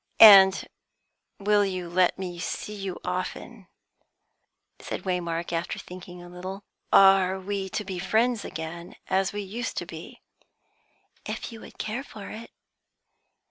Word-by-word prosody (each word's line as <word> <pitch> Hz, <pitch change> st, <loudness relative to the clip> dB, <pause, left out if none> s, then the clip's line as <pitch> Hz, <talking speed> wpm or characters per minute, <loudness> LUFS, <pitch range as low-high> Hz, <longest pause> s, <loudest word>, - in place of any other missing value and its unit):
"And 195 Hz, -3 st, +9 dB, 0.7 s
will 205 Hz, 0 st, +3 dB
you 185 Hz, -3 st, -3 dB
let 180 Hz, +1 st, +2 dB
me 180 Hz, -2 st, -6 dB
see 210 Hz, -, -4 dB
you 195 Hz, -3 st, -5 dB
often?" 185 Hz, +3 st, -5 dB, 1.1 s
said -, -, -6 dB
Waymark, 170 Hz, -2 st, -2 dB
after 165 Hz, 0 st, -2 dB
thinking 180 Hz, -1 st, -10 dB
a -, -, -11 dB
little. 185 Hz, +3 st, -7 dB, 0.3 s
"Are 195 Hz, -1 st, +6 dB
we 195 Hz, 0 st, -3 dB
to 210 Hz, -, -3 dB
be 185 Hz, -2 st, -5 dB
friends 220 Hz, +4 st, +1 dB
again, 165 Hz, +2 st, -7 dB
as 190 Hz, 0 st, +1 dB
we 205 Hz, 0 st, -4 dB
used 225 Hz, +6 st, -5 dB
to -, -, -2 dB
be?" -, -, -10 dB, 1.1 s
"If -, -, -5 dB
you 225 Hz, -1 st, -10 dB
would -, -, -13 dB
care 220 Hz, +5 st, -3 dB
for 215 Hz, -7 st, -10 dB
it." 230 Hz, +2 st, -9 dB
190 Hz, 140 wpm, -26 LUFS, 180-205 Hz, 1.1 s, And